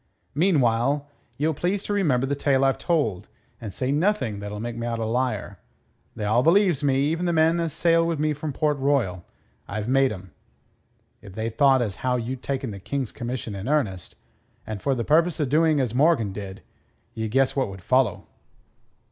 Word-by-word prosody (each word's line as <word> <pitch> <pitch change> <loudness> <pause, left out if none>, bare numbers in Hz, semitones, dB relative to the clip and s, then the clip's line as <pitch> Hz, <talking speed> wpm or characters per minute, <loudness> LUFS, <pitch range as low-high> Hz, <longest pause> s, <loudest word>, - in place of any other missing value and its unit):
"Meanwhile 140 -4 +2 0.3
ye'll 155 +3 +1
please 185 +7 -1
to 205 - -3
remember 145 -11 +2
the 140 - -1
tale 135 -1 +2
I've 135 - +1
told, 145 - -1 0.3
and 110 -3 -6
say 130 +6 -2
nothing 150 - 0
that'll 105 +1 -6
make 120 +1 -4
me 120 0 -4
out 115 -1 -2
a 115 - -2
liar. 125 +3 -2 0.6
They 105 - -4
all 110 +4 +3
believes 170 -1 +3
me, 135 -1 +2
even 165 +4 0
the - - +2
men 165 +1 +3
as 165 -1 -1
sailed 165 +2 +2
wi' 170 - 0
me 155 0 0
from 150 +1 -4
Port 150 +1 0
Royal. 125 -11 0 0.4
I've 105 +2 -4
made 135 +1 +3
'em. 95 -3 -9 0.9
If 100 -3 -12
they 110 +1 -2
thought 135 +2 +4
as 100 -4 -4
how 130 -1 0
you'd 125 +1 -4
taken 135 -4 -3
the 100 - -8
King's 135 +4 -3
commission 120 -2 -5
in 100 +3 -6
earnest, 105 - -1 0.5
and 110 -3 -6
for 135 -1 +1
the 120 - -2
purpose 165 +3 +3
o' 150 - +2
doing 155 +2 +3
as 125 -4 -1
Morgan 130 - +2
did, 100 -1 -8 0.5
ye 110 -1 -3
guess 130 +4 +1
what 135 -6 0
would 95 -2 -10
follow." 125 -4 +1
130 Hz, 190 wpm, -24 LUFS, 110-150 Hz, 0.9 s, thought